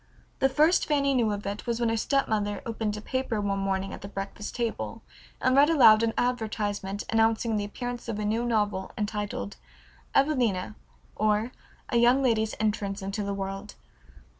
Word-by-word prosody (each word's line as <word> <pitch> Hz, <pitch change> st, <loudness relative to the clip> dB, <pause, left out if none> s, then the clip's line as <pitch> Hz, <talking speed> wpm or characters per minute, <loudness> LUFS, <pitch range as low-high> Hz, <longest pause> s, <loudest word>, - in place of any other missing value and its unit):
The 270 Hz, -, +4 dB
first 310 Hz, +6 st, +3 dB
Fanny 280 Hz, -2 st, +2 dB
knew 235 Hz, -4 st, +2 dB
of 205 Hz, 0 st, -4 dB
it 200 Hz, +4 st, -5 dB
was 235 Hz, -1 st, -1 dB
when 235 Hz, -1 st, +1 dB
her 225 Hz, -, +1 dB
stepmother 215 Hz, -5 st, 0 dB
opened 220 Hz, -2 st, -2 dB
a -, -, -6 dB
paper 260 Hz, -1 st, -2 dB
one 200 Hz, -1 st, -1 dB
morning 195 Hz, 0 st, -1 dB
at -, -, -8 dB
the 200 Hz, -, -7 dB
breakfast 200 Hz, +1 st, -6 dB
table 235 Hz, -2 st, -3 dB, 0.4 s
and 255 Hz, 0 st, +2 dB
read 285 Hz, +2 st, +6 dB
aloud 235 Hz, -9 st, +7 dB
an 230 Hz, -1 st, 0 dB
advertisement 210 Hz, -5 st, -1 dB
announcing 225 Hz, 0 st, +2 dB
the 205 Hz, -1 st, -1 dB
appearance 245 Hz, +3 st, -6 dB
of 215 Hz, -, -2 dB
a 210 Hz, -, -2 dB
new 225 Hz, +3 st, 0 dB
novel 210 Hz, -5 st, 0 dB
entitled 210 Hz, -1 st, -3 dB, 0.6 s
"Evelina; 245 Hz, -10 st, +2 dB, 0.4 s
or, 215 Hz, +3 st, +1 dB, 0.4 s
A -, -, +1 dB
Young 245 Hz, +3 st, +5 dB
Lady's 220 Hz, -3 st, +1 dB
Entrance 205 Hz, -2 st, -1 dB
into 195 Hz, +2 st, -3 dB
the 200 Hz, -1 st, -2 dB
World." 195 Hz, +1 st, -5 dB
220 Hz, 170 wpm, -27 LUFS, 205-240 Hz, 0.6 s, aloud